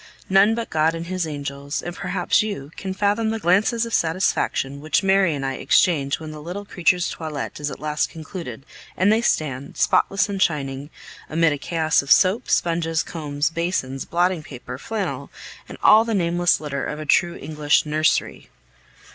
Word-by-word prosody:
None 200 +3 +5
but 230 -1 -5
God 160 +1 +2
and 165 0 -5
His 180 -1 -2
angels 140 -1 -5
and 175 0 -6
perhaps 185 0 +1
you 200 -10 -5
can 190 - -5
fathom 205 +3 +1
the 225 - -1
glances 215 +5 +2
of 230 - -7
satisfaction 160 -5 0
which 155 +5 +1
Mary 190 -4 +3
and 135 -1 -4
I 135 0 -2
exchange 145 -5 +2
when 155 -1 -7
the 155 -1 -9
little 180 +6 -6
creatures' 180 -1 +1
toilet 155 -4 -5
is 145 0 -2
at - - -8
last 150 0 -1
concluded, 155 - -8 0.3
and 195 +3 +4
they 225 - +2
stand, 140 - -1
spotless 200 0 +2
and 200 -2 -4
shining, 140 -4 -1 0.4
amid 165 -1 +2
a 145 - -5
chaos 160 -1 +1
of 140 - -6
soap, 200 +6 +4
sponges, 165 -1 +1
combs, 150 -1 -2
basins, 165 -6 -2
blotting 175 0 +1
paper, 125 -3 -9
flannel, 220 +3 -4 0.4
and - - -9
all 220 +1 +7
the 225 -1 -2
nameless 175 -1 +2
litter 140 -3 -4
of 150 - -4
a 155 - -5
true 170 +3 +2
English 150 0 +1
"nursery." 155 +1 0
165 Hz, 175 wpm, -22 LUFS, 145-190 Hz, 0.4 s, all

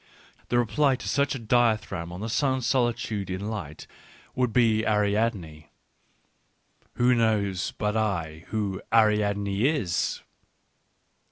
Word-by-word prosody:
The 120 - +2
reply 135 +4 +2
to - - -8
such 140 0 +1
a - - -5
dithyramb 110 -7 0
on 90 +2 -7
the 110 - -3
sun's 130 +1 0
solitude 120 -6 0
in 100 +4 -4
light 80 -9 -7 0.5
would 125 -2 0
be 110 -2 +3
Ariadne.... 105 -7 -1 1.2
Who 125 +1 +3
knows, 105 -6 0
but 105 0 -1
I, 85 -7 -2
who 100 -3 -3
Ariadne 105 -1 +2
is 120 - -1
110 Hz, 115 wpm, -26 LUFS, 100-120 Hz, 1.2 s, be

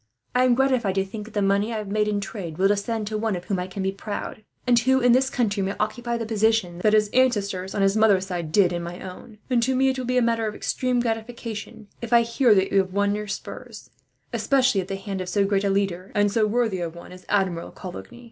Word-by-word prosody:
I 250 +1 +4
am 250 -1 +4
gratified 255 -7 +1
to 195 0 +1
think 210 +2 -7
that 220 - -14
the 205 - +1
money 200 +3 +1
I 225 - -2
have 210 -1 -5
made 210 0 +1
in 205 -1 0
trade 195 -5 -6
will 190 +1 +4
descend 210 +2 -1
to 215 +1 -3
one 220 -2 0
of 180 - -6
whom 195 -3 -1
I 180 - -3
can 190 +1 -5
be 190 - 0
proud; 205 +2 -6 0.2
and 245 -1 +4
who, 260 +3 +3
in 245 -1 +4
this 260 +2 +4
country, 210 -5 0
may 195 +1 -2
occupy 235 +3 -2
the 230 - -3
position 220 -5 +1
that 210 +3 +2
his 210 -1 +4
ancestors 200 -7 +1
on 200 - +1
his 195 +1 +3
mother's 205 -4 +4
side 175 -4 -4
did 180 0 +4
in 175 - -2
my 170 +1 -7
own; 190 +4 -10
and 250 -3 +2
to 260 +3 +1
me 265 +1 +3
it 260 0 -2
will 255 - -3
be 255 0 +1
a - - +4
matter 230 -1 +1
of 210 - -4
extreme 250 -1 0
gratification 225 -2 -5
if 235 0 -3
I 235 - +7
hear 235 -1 +3
that 190 0 +2
you 195 - +4
have 185 -1 -1
won 200 0 +1
your 210 0 -4
spurs, 200 - -8 0.4
especially 260 -7 +2
at 185 - -8
the 195 - -3
hand 195 -1 -5
of 180 - -5
so 200 +1 +2
great 195 0 +1
a 200 - +1
leader, 195 -1 -1
and 205 -1 +3
so 215 0 +2
worthy 220 -3 0
a 170 - -2
one, 170 +2 -12
as 180 0 -12
Admiral 190 -4 0
Coligny. 190 +6 -9
210 Hz, 260 wpm, -24 LUFS, 195-235 Hz, 0.4 s, I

